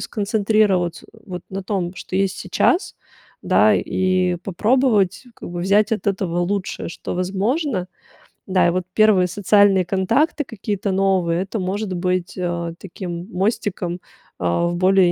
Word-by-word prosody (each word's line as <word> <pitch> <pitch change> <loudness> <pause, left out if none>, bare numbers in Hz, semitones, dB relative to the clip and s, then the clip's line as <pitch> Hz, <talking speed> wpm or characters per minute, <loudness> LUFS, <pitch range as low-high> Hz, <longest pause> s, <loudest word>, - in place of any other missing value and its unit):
сконцентрироваться 205 -4 0 0.2
вот 180 -2 -6
на 195 0 -5
том, 185 -3 -2
что 185 - -5
есть 195 -1 +1
сейчас, 365 +3 +1 0.5
да, - - +4
и 185 -1 +1
попробовать 210 +2 +1
как - - -8
бы 175 0 -4
взять 205 +5 +3
от 210 -2 -2
этого 185 -3 -1
лучшее, 190 0 -2
что 165 - -6
возможно. 195 - -1 0.6
Да, 185 -1 +3
и - - +4
вот 185 0 -1
1 210 -4 +4
социальные 200 -1 +3
контакты 230 - +1
какие-то 205 -3 -3
новые- 185 -3 +1
это 200 +2 -5
может 190 +1 -2
быть, 180 0 -1
э, 170 -2 -2
таким 175 -1 -7
мостиком, 185 -2 -1 0.4
а, 85 - +1
в 175 - -2
более 185 0 +4
190 Hz, 140 wpm, -21 LUFS, 180-205 Hz, 0.6 s, да